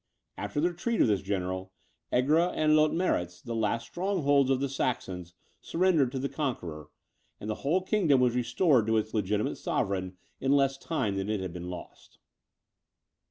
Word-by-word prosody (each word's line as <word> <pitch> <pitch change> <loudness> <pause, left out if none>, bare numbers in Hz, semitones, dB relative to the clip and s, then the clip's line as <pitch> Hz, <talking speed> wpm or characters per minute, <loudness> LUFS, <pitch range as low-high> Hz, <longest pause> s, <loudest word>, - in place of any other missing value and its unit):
After - - -3
the 170 +4 +3
retreat 220 +7 -2
of - - +5
this 100 -3 +2
general, 95 -1 -3 0.4
Egra 155 +8 +3
and 155 0 +3
Leutmeritz, 155 - +1
the 120 - -6
last 115 +1 0
strongholds 145 -8 +1
of 135 -1 +2
the 140 - 0
Saxons, 90 -10 -3 0.3
surrendered 165 -7 +2
to - - -2
the 135 +1 -1
conqueror: 90 - -4 0.5
and 105 - -7
the 110 - 0
whole 170 +7 +1
kingdom 180 -9 +3
was 125 -2 +3
restored 125 - +2
to 110 0 +3
its 110 0 -2
legitimate 105 0 0
sovereign, 95 -1 -2 0.2
in 135 +1 +2
less 135 -1 +2
time 115 -12 -1
than 95 +1 -2
it 110 -2 0
had 95 -2 -5
been 90 0 -6
lost. 90 -1 -10
125 Hz, 165 wpm, -29 LUFS, 100-155 Hz, 0.5 s, of